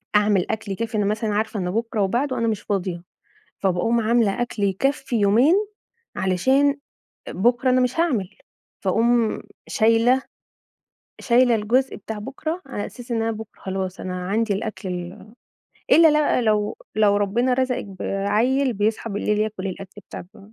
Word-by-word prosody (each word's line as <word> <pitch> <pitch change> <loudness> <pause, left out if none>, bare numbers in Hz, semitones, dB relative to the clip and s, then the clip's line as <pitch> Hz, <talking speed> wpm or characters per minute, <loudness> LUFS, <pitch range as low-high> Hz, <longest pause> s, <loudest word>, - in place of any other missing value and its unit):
أعمل 205 -3 +3
أكل 220 -2 -4
يكفّي 225 +3 -3
أنا 205 - +1
مثلًا 215 +1 -1
عارفة 215 0 -1
إن 180 -1 -2
بكرة 225 +1 -1
وبعده 245 +8 0
أنا 230 - 0
مش 215 -2 -1
فاضية، 185 -4 -3 0.6
فباقوم 195 +5 +1
عاملة 230 0 +2
أكل 235 -3 -4
يكفي 245 +6 0
يومين 230 - +4 0.6
علشان 265 +10 +2 0.5
بكرة 240 +6 +1
أنا 255 0 +3
مش 250 +5 0
هاعمل. 215 - 0 0.4
فأقوم 230 +3 +2 0.3
شايلة 230 +4 +3 1.0
شايلة 245 -1 +4
الجزء 240 +5 +1
بتاع 215 +1 -7
بكرة، 310 - -5
على 205 - -4
أساس 245 -1 -10
إن 225 - 0
أنا 225 0 0
بكرة 220 -1 -9
خلاص 190 -1 -4
أنا 180 -1 -5
عندي 220 +1 +1
الأكل 200 -1 -4
ال 180 +4 -7 0.6
إلّا 325 0 +7
بقى 300 -4 +2
لو 210 -2 +1 0.2
لو 210 -1 +3
ربنا 230 +6 +1
رزقِك 255 -1 -1
بعيّل 210 +7 0
بيصحى 215 +2 -1
بالليل 210 +1 -1
ياكل 215 -3 -2
الأكل 195 +2 -8
بتاعكم 205 +3 -11
220 Hz, 145 wpm, -22 LUFS, 200-245 Hz, 1.0 s, إلّا